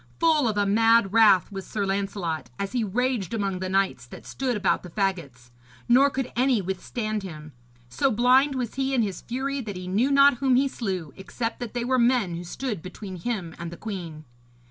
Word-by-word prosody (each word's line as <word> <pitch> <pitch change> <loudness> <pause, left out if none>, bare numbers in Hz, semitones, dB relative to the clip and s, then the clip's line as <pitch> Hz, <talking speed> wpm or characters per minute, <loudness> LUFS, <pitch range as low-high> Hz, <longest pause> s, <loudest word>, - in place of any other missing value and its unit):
Full 315 -5 +3
of 215 -2 -1
a 205 - +2
mad 225 0 +4
wrath 215 -4 +5
was 195 -1 -6
Sir 205 -2 -2
Lancelot, 195 -4 -2
as 200 0 -3
he 245 -2 0
raged 230 0 -1
among 195 -4 -2
the 185 0 -3
knights 190 -11 0
that - - -12
stood 255 -4 -2
about 195 - +1
the 180 - -10
faggots; 165 - -3 0.4
nor 270 +4 +5
could 265 -2 -3
any 255 -1 +3
withstand 210 +3 -3
him. 155 -5 -9 0.4
So 125 - +1
blind 260 +4 +4
was 245 -3 -3
he 270 0 -1
in 240 - +3
his 195 -4 -4
fury 270 +3 -3
that 205 -5 -6
he 180 0 -7
knew 215 +9 +1
not 280 -2 +5
whom 265 0 +2
he 270 +2 +3
slew, 185 - -4
except 230 +4 -4
that 240 -1 -6
they 240 -1 -1
were 255 0 +2
men 235 -7 +2
who 170 +1 -5
stood 210 +2 -4
between 185 +1 -8
him 180 -4 -4
and 170 - -5
the 170 - -9
queen. 170 -8 -7
210 Hz, 205 wpm, -25 LUFS, 185-250 Hz, 0.4 s, wrath